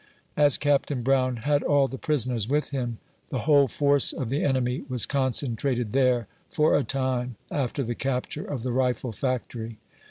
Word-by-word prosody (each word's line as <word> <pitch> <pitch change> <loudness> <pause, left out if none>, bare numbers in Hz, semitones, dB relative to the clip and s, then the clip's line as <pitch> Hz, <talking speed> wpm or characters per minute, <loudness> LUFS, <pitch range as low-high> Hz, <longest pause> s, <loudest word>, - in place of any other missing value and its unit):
As 145 -2 +3
Capt. 145 -3 +1
Brown 130 -1 +2
had 145 +5 +1
all 140 -2 +3
the 135 -1 -7
prisoners 125 -7 0
with 150 +1 0
him, 120 -4 -3 0.3
the 130 - -2
whole 145 -1 +5
force 140 +1 +3
of 125 - -4
the 140 +3 0
enemy 130 -2 0
was 125 -3 -1
concentrated 130 -3 -1
there, 125 -3 +2 0.2
for 155 -3 +3
a 145 - +2
time, 130 -3 -1 0.2
after 140 0 -1
the 120 0 -2
capture 135 +4 -2
of 130 -5 -5
the 125 - -1
rifle 125 -1 0
factory. 115 -2 -3
130 Hz, 165 wpm, -26 LUFS, 125-140 Hz, 0.3 s, whole